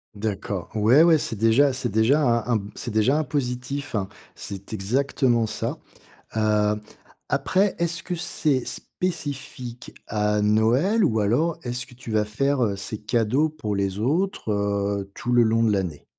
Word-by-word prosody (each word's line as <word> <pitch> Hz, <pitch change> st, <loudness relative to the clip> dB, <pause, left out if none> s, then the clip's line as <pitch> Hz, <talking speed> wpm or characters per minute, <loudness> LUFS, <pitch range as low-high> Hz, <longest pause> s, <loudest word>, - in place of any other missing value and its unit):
D'accord. 100 Hz, -3 st, -3 dB
Ouais, 115 Hz, +9 st, +5 dB
ouais, 165 Hz, -2 st, +6 dB
c'est 115 Hz, -, -2 dB
déjà 115 Hz, +6 st, +4 dB
c'est 125 Hz, -2 st, -2 dB
déjà 110 Hz, +9 st, +3 dB
un 120 Hz, -2 st, +2 dB
un -, -, +2 dB, 0.2 s
c'est 120 Hz, -, -4 dB
déjà 110 Hz, +7 st, +3 dB
un -, -, +1 dB
positif, 130 Hz, -1 st, -3 dB, 0.4 s
c'est 100 Hz, +2 st, -7 dB
exactement 120 Hz, +2 st, +1 dB
ça. -, -, -3 dB, 0.6 s
Heu, 105 Hz, -1 st, +2 dB, 0.5 s
après, 195 Hz, +1 st, +2 dB
est-ce 165 Hz, -2 st, -1 dB
que 180 Hz, -, -4 dB
c'est 150 Hz, -6 st, 0 dB
spécifique 140 Hz, -8 st, -5 dB
à 105 Hz, 0 st, 0 dB
Noël? 120 Hz, -, +3 dB
Ou 110 Hz, -1 st, +2 dB
alors, 155 Hz, +11 st, +1 dB
est-ce 120 Hz, 0 st, -4 dB
que 125 Hz, -, -16 dB
tu 120 Hz, -2 st, -10 dB
vas 105 Hz, -1 st, +2 dB
faire, 135 Hz, +5 st, 0 dB
heu, 100 Hz, -2 st, 0 dB
ces 105 Hz, +2 st, -6 dB
cadeaux 120 Hz, +7 st, +1 dB
pour 130 Hz, -10 st, -4 dB
les 100 Hz, 0 st, -1 dB
autres, 160 Hz, -, 0 dB
heu, 100 Hz, -1 st, -1 dB
tout 125 Hz, -, -3 dB
le 120 Hz, -1 st, +6 dB
long 115 Hz, +1 st, +2 dB
de 110 Hz, -, +3 dB
l'année? 90 Hz, -7 st, -2 dB
120 Hz, 160 wpm, -24 LUFS, 105-140 Hz, 0.6 s, ouais